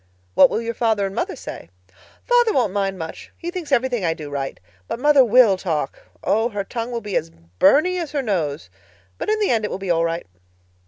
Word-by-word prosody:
"What - - +7
will 230 - -2
your 230 0 -3
father 220 -3 +1
and 195 - -4
mother - - -2
say?" 85 - -9 0.5
"Father 485 -3 +3
won't 235 -7 +1
say 200 -1 +1
much. 165 -4 -8
He 345 0 -5
thinks 350 -5 -6
everything 250 -4 +1
I 165 -1 +1
do 150 -4 -8
right. 135 -1 -4 0.3
But - - -4
mother 290 0 +6
will 235 -4 +5
talk. 160 -7 -2 0.2
Oh, 225 +3 +2
her 205 -3 -3
tongue 230 +4 -4
will 235 -1 -3
be 205 -3 -5
as 165 - 0 0.3
Byrney 315 - +4
as 330 -4 -4
her 285 -2 0
nose. 155 - -2 0.5
But - - -3
in 430 0 +2
the 415 - +2
end 225 -2 +1
it 210 - -1
will - - -3
be 195 -2 -2
all 165 -1 +2
right." 165 0 -2
215 Hz, 220 wpm, -21 LUFS, 175-260 Hz, 0.5 s, What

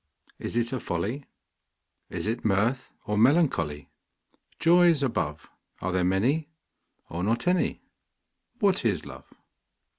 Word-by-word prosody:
Is - - -3
it 120 +1 0
a 130 - -1
folly, 105 +10 -3 0.8
Is - - -4
it 115 +3 -2
mirth, 115 +5 +1
or 105 0 0
melancholy? 110 - +2 0.7
Joys 170 -3 +5
above, 75 - -2 0.3
Are 95 - -2
there 90 0 +1
many, 125 - +1 0.6
or 85 +2 -4
not 115 +4 0
any? 180 0 +1 0.7
What 200 - +2
is 100 -9 0
Love? - - -11
115 Hz, 120 wpm, -27 LUFS, 95-145 Hz, 0.8 s, Joys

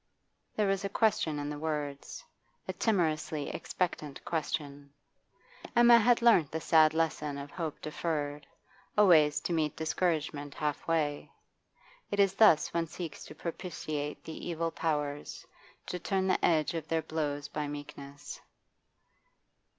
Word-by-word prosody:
There 210 - +2
was 195 0 0
a 200 - -2
question 200 -8 +1
in 145 0 -3
the 145 - -5
words, 150 - -4 0.4
a - - -2
timorously 160 -7 0
expectant 155 -5 -3
question. 145 -3 -3 0.9
Emma 240 0 +8
had 235 +1 +3
learnt 200 -11 +5
the 160 - -3
sad 155 -1 +4
lesson 150 -3 -1
of 140 0 -7
hope 160 -4 -4
deferred, 150 -2 -3 0.5
always 155 -8 +6
to 175 - -2
meet 155 -3 0
discouragement 155 -3 -1
halfway. 150 0 -1 0.8
It 205 - -2
is 195 -1 +4
thus 195 -7 +5
one 165 0 0
seeks 160 0 -7
to 155 - -11
propitiate 155 -3 -5
the 160 - -7
evil 165 0 -1
powers, 145 -3 -3 0.4
to 180 - -4
turn 190 +1 0
the 190 - +1
edge 155 -2 +3
of 160 -2 -4
their 160 0 0
blows 145 -2 -3
by 150 -1 -3
meekness. 145 -1 -8
155 Hz, 135 wpm, -31 LUFS, 145-175 Hz, 0.9 s, Emma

